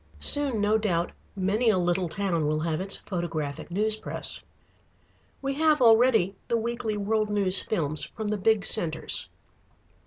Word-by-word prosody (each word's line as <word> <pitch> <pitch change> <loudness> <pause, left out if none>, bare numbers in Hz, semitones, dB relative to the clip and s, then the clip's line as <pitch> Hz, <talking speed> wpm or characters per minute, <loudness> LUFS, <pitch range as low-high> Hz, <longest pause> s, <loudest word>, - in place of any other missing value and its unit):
Soon, 285 -6 +2
no 210 +2 +2
doubt, 175 -5 -1 0.2
many 200 +5 +1
a 210 - +3
little 175 0 0
town 170 -4 -1
will 155 +1 0
have 160 +1 -2
its 195 +1 -2
photographic 165 -7 -5
news 210 +4 0
press. - - -3 1.0
We 275 0 -1
have 305 +1 +2
already 225 -5 +4
the 235 - +1
weekly 230 -1 -3
world 215 +1 0
news 195 -2 +3
films 155 -7 -1
from 215 -2 -6
the 210 - -1
big 205 0 +1
centres. 165 -7 +2
205 Hz, 150 wpm, -26 LUFS, 175-220 Hz, 1.0 s, already